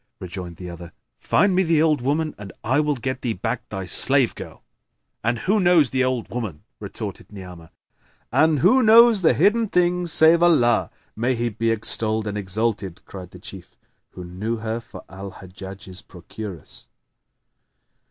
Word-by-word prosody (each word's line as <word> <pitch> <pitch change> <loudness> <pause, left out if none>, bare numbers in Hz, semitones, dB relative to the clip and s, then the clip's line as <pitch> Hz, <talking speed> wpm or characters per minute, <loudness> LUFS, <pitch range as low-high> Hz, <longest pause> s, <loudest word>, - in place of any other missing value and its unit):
Rejoined 90 -1 -7
the 90 +2 -9
other, 85 -1 -10 0.3
"Find 200 -1 +2
me 185 - +4
the 165 -4 +2
old 155 -4 +2
woman 150 +4 -1
and 100 -2 -9
I 130 +6 +1
will 150 -1 +1
get 130 +1 -4
thee 120 -3 -1
back 95 - -4
thy 95 -2 -5
slave 130 +8 +1
girl." - - -11 0.6
"And 115 +2 0
who 200 - +1
knows 175 - +4
the 130 -1 +1
old 130 -2 -1
woman?" 110 -11 -5 0.2
retorted - - -7
Ni'amah. 90 -4 -11 0.6
"And 155 -1 +3
who 250 - +5
knows 225 -1 +7
the 165 - +4
hidden 210 +7 +3
things 180 -1 +1
save 160 +2 +5
Allah 125 -10 +3 0.3
(may 125 +4 0
He 120 0 -1
be 115 +1 -2
extolled 110 0 0
and 105 -1 -4
exalted!)?" 100 -2 -2
cried 90 -2 -10
the - - -13
Chief, - - -12 0.4
who 90 - -8
knew 95 +6 -4
her 110 +1 -3
for 115 - -12
Al 95 +1 -9
Hajjaj's 95 0 -10
procuress. 90 -1 -10
115 Hz, 160 wpm, -22 LUFS, 95-160 Hz, 0.6 s, knows